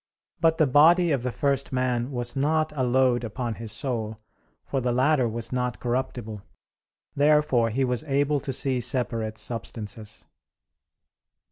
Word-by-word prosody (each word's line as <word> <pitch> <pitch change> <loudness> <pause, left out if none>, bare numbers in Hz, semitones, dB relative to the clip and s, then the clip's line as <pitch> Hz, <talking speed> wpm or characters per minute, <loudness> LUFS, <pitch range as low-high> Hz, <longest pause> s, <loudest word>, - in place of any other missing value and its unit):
But 160 -1 +3
the 155 - +4
body 160 +6 +5
of 135 -4 +1
the 125 0 -2
first 140 +1 -1
man 125 -1 0
was 120 -2 -4
not 155 +3 +1
a 130 - 0
load 125 -1 +2
upon 115 +1 -3
his 115 -1 -5
soul; 115 -2 -3 0.5
for 135 - -2
the 125 0 0
latter 130 0 +2
was 115 +1 -5
not 125 -1 -2
corruptible. 120 -4 -3 0.7
Therefore 145 -5 +3
he 130 +4 0
was 125 +1 -1
able 145 +1 +1
to 135 - -4
see 130 0 0
separate 115 -3 -1
substances. 110 -2 -6
125 Hz, 145 wpm, -25 LUFS, 115-140 Hz, 0.7 s, body